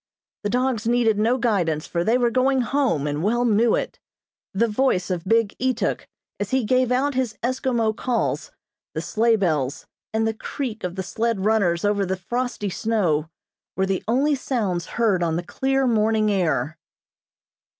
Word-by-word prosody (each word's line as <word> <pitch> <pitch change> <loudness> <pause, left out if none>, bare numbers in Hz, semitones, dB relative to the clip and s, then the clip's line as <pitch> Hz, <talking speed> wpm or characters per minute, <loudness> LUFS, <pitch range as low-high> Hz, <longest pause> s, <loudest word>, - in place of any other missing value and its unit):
The 205 - -2
dogs 250 -2 0
needed 235 -3 +2
no 230 +4 +2
guidance, 180 -11 0
for 170 -1 -1
they 225 +6 +3
were 240 -1 +2
going 260 +2 +2
home, 245 - 0
and 145 0 -2
well 240 +6 +1
knew 225 0 +3
it. - - -4 0.5
The 220 +4 +2
voice 210 -5 +1
of 175 -2 -3
big 225 +1 +2
Ituk, 255 -2 -1 0.3
as 205 -1 -2
he 260 -1 +1
gave 255 +2 +2
out 275 +3 +1
his 255 -4 -1
Eskimo 240 -3 0
calls, 245 0 -1 0.5
the - - -1
sleigh 230 +1 +2
bells, 155 -10 -1 0.3
and 220 0 0
the 225 - 0
creak 225 0 -5
of 180 -1 -3
the 190 - -3
sled 220 0 -1
runners 200 -5 +2
over 205 -1 +2
the 190 0 -2
frosty 240 +1 -3
snow, 175 -9 0 0.5
were 190 - +2
the 190 -1 -1
only 270 +6 +2
sounds 210 -10 -1
heard 215 -6 +2
on 165 -2 0
the 175 - -2
clear 270 +7 0
morning 215 -2 +2
air. 160 -5 0
220 Hz, 170 wpm, -23 LUFS, 185-245 Hz, 0.5 s, they